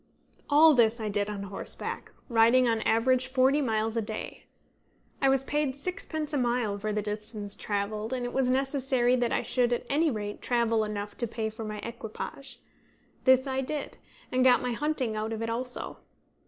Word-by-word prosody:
All 305 Hz, +2 st, +7 dB
this 235 Hz, -2 st, +3 dB
I 215 Hz, -1 st, -2 dB
did 205 Hz, 0 st, 0 dB
on 200 Hz, -1 st, -4 dB
horseback, 195 Hz, 0 st, -4 dB, 0.2 s
riding 235 Hz, +1 st, +5 dB
on 225 Hz, -1 st, +2 dB
an -, -, -2 dB
average 255 Hz, +3 st, +3 dB
forty 265 Hz, +2 st, +3 dB
miles 220 Hz, -3 st, 0 dB
a 230 Hz, -, +1 dB
day. 215 Hz, 0 st, -6 dB, 0.8 s
I 270 Hz, -, +4 dB
was 270 Hz, 0 st, +2 dB
paid 290 Hz, -1 st, -1 dB
sixpence 315 Hz, -1 st, -5 dB
a 290 Hz, -, +1 dB
mile 240 Hz, -4 st, 0 dB
for 215 Hz, +1 st, -2 dB
the 210 Hz, 0 st, -1 dB
distance 210 Hz, 0 st, -5 dB
travelled, 210 Hz, +1 st, -3 dB
and 250 Hz, -1 st, -2 dB
it 245 Hz, -, -5 dB
was 265 Hz, -1 st, +2 dB
necessary 260 Hz, -2 st, +2 dB
that 240 Hz, -1 st, 0 dB
I -, -, 0 dB
should 245 Hz, -1 st, +1 dB
at 240 Hz, -, -1 dB
any 310 Hz, +3 st, +3 dB
rate 205 Hz, -4 st, -4 dB
travel 230 Hz, -2 st, +1 dB
enough 205 Hz, -1 st, -4 dB
to 235 Hz, -, 0 dB
pay 220 Hz, 0 st, -3 dB
for 220 Hz, +1 st, -7 dB
my 215 Hz, -1 st, -5 dB
equipage. 240 Hz, +3 st, -7 dB, 0.6 s
This 260 Hz, 0 st, +5 dB
I 265 Hz, -1 st, -1 dB
did, 285 Hz, +2 st, -4 dB, 0.3 s
and 255 Hz, 0 st, +2 dB
got 255 Hz, -1 st, +6 dB
my 250 Hz, -, -1 dB
hunting 260 Hz, -3 st, -1 dB
out 215 Hz, +1 st, -2 dB
of 225 Hz, 0 st, -3 dB
it 230 Hz, -, -2 dB
also. 250 Hz, +2 st, -4 dB
240 Hz, 190 wpm, -28 LUFS, 215-265 Hz, 0.8 s, All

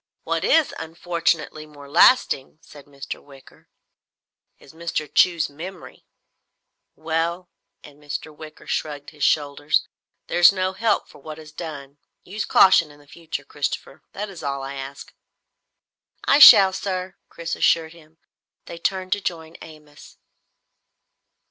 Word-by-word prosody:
What -, -, -2 dB
is 320 Hz, -2 st, +3 dB
unfortunately 165 Hz, -2 st, -2 dB
more 145 Hz, -2 st, -14 dB
lasting," 155 Hz, -, +3 dB
said 145 Hz, -2 st, -15 dB
Mr. 140 Hz, -1 st, -9 dB
Wicker, 135 Hz, -2 st, -19 dB, 0.9 s
"is 140 Hz, -, -18 dB
Mr. 165 Hz, -2 st, -4 dB
Chew's 170 Hz, -4 st, +3 dB
memory. 170 Hz, +5 st, -11 dB, 0.9 s
Well" 165 Hz, +3 st, -3 dB, 0.3 s
and 145 Hz, 0 st, -16 dB
Mr. 150 Hz, +1 st, -7 dB
Wicker 155 Hz, 0 st, -13 dB
shrugged 145 Hz, -2 st, -4 dB
his 150 Hz, -3 st, -8 dB
shoulders 145 Hz, 0 st, +1 dB, 0.4 s
"there's 175 Hz, +1 st, +5 dB
no 185 Hz, -1 st, -2 dB
help 225 Hz, +3 st, 0 dB
for -, -, -17 dB
what 155 Hz, +2 st, -9 dB
is 155 Hz, -1 st, -13 dB
done. 145 Hz, -4 st, -9 dB, 0.2 s
Use 205 Hz, +3 st, -5 dB
caution 185 Hz, -4 st, +5 dB
in 145 Hz, 0 st, -17 dB
the 145 Hz, -, -20 dB
future, 160 Hz, 0 st, -7 dB
Christopher. 140 Hz, -1 st, -5 dB
That 210 Hz, +2 st, -5 dB
is 180 Hz, -, -11 dB
all 140 Hz, -1 st, -4 dB
I 135 Hz, +1 st, -6 dB
ask." 135 Hz, 0 st, -9 dB, 1.1 s
"I 280 Hz, -, +4 dB
shall, 200 Hz, -9 st, +10 dB
sir!" 185 Hz, -1 st, -4 dB
Chris 165 Hz, 0 st, -5 dB
assured 165 Hz, -1 st, +1 dB
him. 160 Hz, -1 st, -20 dB, 0.5 s
They 170 Hz, -, -9 dB
turned 185 Hz, +1 st, -2 dB
to 205 Hz, -, 0 dB
join 165 Hz, -3 st, -5 dB
Amos. 150 Hz, -2 st, -15 dB
160 Hz, 135 wpm, -22 LUFS, 145-175 Hz, 1.1 s, shall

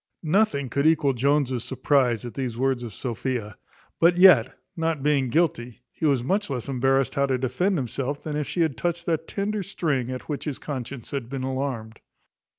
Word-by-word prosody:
Nothing 160 Hz, -4 st, +2 dB
could 140 Hz, +5 st, +1 dB
equal 155 Hz, -4 st, +3 dB
Jones's 130 Hz, -1 st, +1 dB
surprize 125 Hz, -5 st, +1 dB
at 120 Hz, -, -6 dB
these 125 Hz, -4 st, -3 dB
words 130 Hz, -1 st, +1 dB
of 120 Hz, -2 st, -6 dB
Sophia; 115 Hz, -1 st, -4 dB, 0.4 s
but 175 Hz, +1 st, +5 dB
yet, 175 Hz, -10 st, +6 dB, 0.2 s
not 160 Hz, -4 st, -1 dB
being 140 Hz, -3 st, +2 dB
guilty, 125 Hz, -6 st, 0 dB
he 160 Hz, -, -1 dB
was 135 Hz, -4 st, +2 dB
much 200 Hz, +9 st, 0 dB
less 125 Hz, -4 st, -4 dB
embarrassed 135 Hz, -1 st, +1 dB
how 140 Hz, 0 st, +1 dB
to 130 Hz, -1 st, +1 dB
defend 135 Hz, +10 st, 0 dB
himself 135 Hz, +2 st, -3 dB
than 150 Hz, -2 st, -4 dB
if 150 Hz, -1 st, -2 dB
she 175 Hz, -, -1 dB
had 155 Hz, -7 st, +1 dB
touched 170 Hz, +4 st, -2 dB
that 165 Hz, -2 st, -1 dB
tender 210 Hz, +1 st, -2 dB
string 150 Hz, -9 st, -1 dB
at 130 Hz, 0 st, -6 dB
which 145 Hz, -2 st, -4 dB
his 150 Hz, -4 st, -3 dB
conscience 130 Hz, -3 st, -6 dB
had 135 Hz, -5 st, -4 dB
been 135 Hz, -1 st, -4 dB
alarmed. 130 Hz, -4 st, -3 dB
135 Hz, 185 wpm, -25 LUFS, 125-155 Hz, 0.4 s, yet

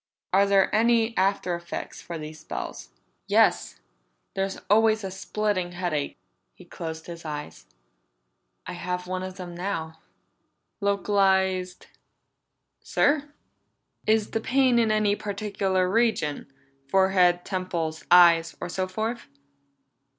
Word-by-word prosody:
Are 200 Hz, +1 st, +5 dB
there 195 Hz, -1 st, +3 dB
any 230 Hz, +1 st, +3 dB
after 190 Hz, -2 st, +1 dB
effects 170 Hz, 0 st, -6 dB
from 170 Hz, -2 st, -7 dB
these 155 Hz, +1 st, -8 dB
spells?" 155 Hz, -, -7 dB, 0.4 s
"Yes. -, -, +2 dB, 0.5 s
There's 195 Hz, 0 st, -2 dB
always 220 Hz, +1 st, +4 dB
a 190 Hz, -, -4 dB
splitting 195 Hz, -2 st, -2 dB
headache." 175 Hz, -5 st, -2 dB, 0.4 s
He -, -, -15 dB
closed 160 Hz, -1 st, -7 dB
his 170 Hz, -1 st, -9 dB
eyes. 150 Hz, -, -7 dB, 1.0 s
"I -, -, -6 dB
have 180 Hz, 0 st, -4 dB
one 185 Hz, 0 st, -3 dB
of 185 Hz, 0 st, -7 dB
them 180 Hz, -2 st, -7 dB
now." 165 Hz, -3 st, -4 dB, 0.8 s
"Localized?" 190 Hz, -2 st, +1 dB, 1.0 s
"Sir?" 290 Hz, 0 st, +1 dB, 0.8 s
"Is 215 Hz, -1 st, +2 dB
the 225 Hz, -, -1 dB
pain 255 Hz, 0 st, +3 dB
in 225 Hz, -2 st, +2 dB
any 215 Hz, -1 st, +2 dB
particular 200 Hz, -3 st, -1 dB
region? 195 Hz, -10 st, 0 dB, 0.4 s
Forehead, 185 Hz, 0 st, +3 dB
temples, 175 Hz, -5 st, -3 dB
eyes, 170 Hz, -2 st, +6 dB
or 175 Hz, -, -5 dB
so 185 Hz, +1 st, -2 dB
forth?" 220 Hz, +5 st, -4 dB
190 Hz, 115 wpm, -26 LUFS, 175-210 Hz, 1.0 s, eyes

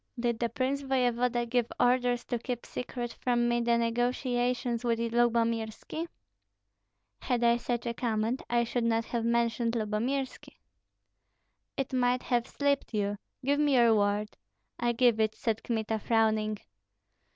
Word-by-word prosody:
"Did 235 Hz, -1 st, 0 dB
the 235 Hz, -, 0 dB
prince 260 Hz, +4 st, -1 dB
voevoda 250 Hz, -2 st, +1 dB
give 240 Hz, -1 st, 0 dB
orders 245 Hz, -1 st, +2 dB
to 240 Hz, -, -2 dB
keep 245 Hz, 0 st, -4 dB
secret 245 Hz, -1 st, -5 dB
from 240 Hz, -1 st, +2 dB
me 240 Hz, 0 st, +1 dB
the 235 Hz, 0 st, +2 dB
negotiations 245 Hz, 0 st, 0 dB
with 235 Hz, -1 st, +1 dB
Lyubomirski?" 230 Hz, +5 st, 0 dB, 1.1 s
"Had 245 Hz, -2 st, 0 dB
I 235 Hz, 0 st, +5 dB
such 240 Hz, 0 st, -3 dB
a 235 Hz, -, -1 dB
command, 230 Hz, +1 st, -1 dB
I 240 Hz, 0 st, +3 dB
should 235 Hz, +1 st, -1 dB
not 230 Hz, 0 st, +1 dB
have 235 Hz, -2 st, -2 dB
mentioned 235 Hz, 0 st, +1 dB
Lyubomirski." 235 Hz, +5 st, -2 dB, 1.2 s
"It 270 Hz, 0 st, -2 dB
might 250 Hz, 0 st, +2 dB
have 240 Hz, -1 st, 0 dB
slipped 280 Hz, -4 st, -1 dB
you. 205 Hz, -1 st, -1 dB, 0.3 s
Give 285 Hz, +1 st, +2 dB
me 295 Hz, -2 st, +3 dB
your 235 Hz, -2 st, +6 dB
word." 205 Hz, 0 st, +1 dB, 0.4 s
"I 240 Hz, 0 st, +2 dB
give 235 Hz, -2 st, +3 dB
it," 220 Hz, 0 st, +1 dB
said 225 Hz, -2 st, -1 dB
Kmita, 220 Hz, -1 st, -1 dB
frowning. 215 Hz, -1 st, +1 dB
235 Hz, 140 wpm, -29 LUFS, 230-245 Hz, 1.2 s, your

